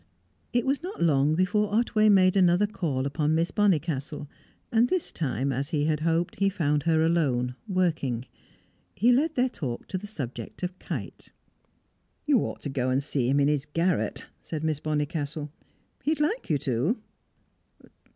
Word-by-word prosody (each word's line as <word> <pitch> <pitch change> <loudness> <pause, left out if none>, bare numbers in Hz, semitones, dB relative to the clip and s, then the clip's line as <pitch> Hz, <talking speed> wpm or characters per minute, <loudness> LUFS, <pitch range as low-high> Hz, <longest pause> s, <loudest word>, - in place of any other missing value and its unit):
It 240 -1 +1
was 275 +2 +1
not 365 +4 -7
long 150 -1 +3
before 200 +4 +1
Otway 215 -2 +3
made 185 -2 +5
another 180 +1 +4
call 155 -10 -2
upon 150 +2 0
Miss 165 +1 +1
Bonnicastle, 155 -7 0 0.4
and 230 +1 +4
at - - -4
this 370 -3 -1
time, 135 -3 -1
as 135 +3 -2
he 150 -4 0
had 155 -1 +1
hoped, 165 +2 0
he 195 0 +3
found 150 -6 0
her 160 +1 +2
alone, 135 -7 +1
working. 160 - 0 0.7
He 235 +6 +4
led 295 +6 +2
their 250 +1 +3
talk 130 - -5
to 185 - -2
the 210 - -8
subject 130 - -6
of 180 +1 -4
Kite. - - -6 1.0
"You 290 -5 +4
ought - - -4
to 145 - -4
go 130 -2 -1
and 130 +2 +1
see 135 -4 0
him 140 +2 +3
in 140 - +4
his 150 -1 0
garret," 165 +4 0 0.2
said 155 -2 -5
Miss 155 -2 0
Bonnicastle. 150 0 -2 0.5
"He'd 305 0 0
like 325 - 0
you 150 - +3
to." 135 - 0
160 Hz, 170 wpm, -27 LUFS, 140-200 Hz, 1.0 s, made